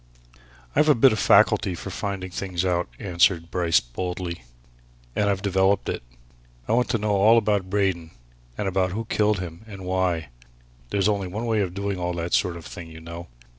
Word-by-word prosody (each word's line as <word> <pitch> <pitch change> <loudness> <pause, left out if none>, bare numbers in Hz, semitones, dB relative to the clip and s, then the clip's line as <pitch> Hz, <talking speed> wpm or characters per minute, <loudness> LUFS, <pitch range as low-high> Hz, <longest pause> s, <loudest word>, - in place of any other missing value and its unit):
"I've 155 - +4
a 150 - +6
bit 125 +2 +6
of 110 - -1
a - - 0
faculty 90 - +4
for 95 - -7
finding 95 -1 -4
things 95 -1 -3
out," 90 -1 +1
answered 85 -2 +1
Bryce 85 -3 +3
boldly. 90 +6 -5 0.7
"And 105 -1 +2
I've 95 -1 -1
developed 95 0 +2
it. - - -3 0.7
I - - -1
wanted 120 +2 +2
to - - +3
know 105 0 -1
all 105 +3 +5
about 105 -4 +1
Braden 95 -5 0 0.5
and 105 - -2
about 95 -1 0
who 115 +2 -3
killed 105 -1 +1
him 85 +1 -8
and 95 -3 -9
why. 90 -5 0 0.6
There's 100 -1 +1
only 100 -3 0
one 105 +6 -4
way 110 -2 +1
of 90 -2 -3
doing 100 -1 -2
all 90 0 -2
that 85 0 -4
sort 90 -2 +2
of 80 - -11
thing, 85 -2 -8
you 80 0 -11
know. 85 +1 -8
95 Hz, 195 wpm, -24 LUFS, 85-100 Hz, 0.7 s, a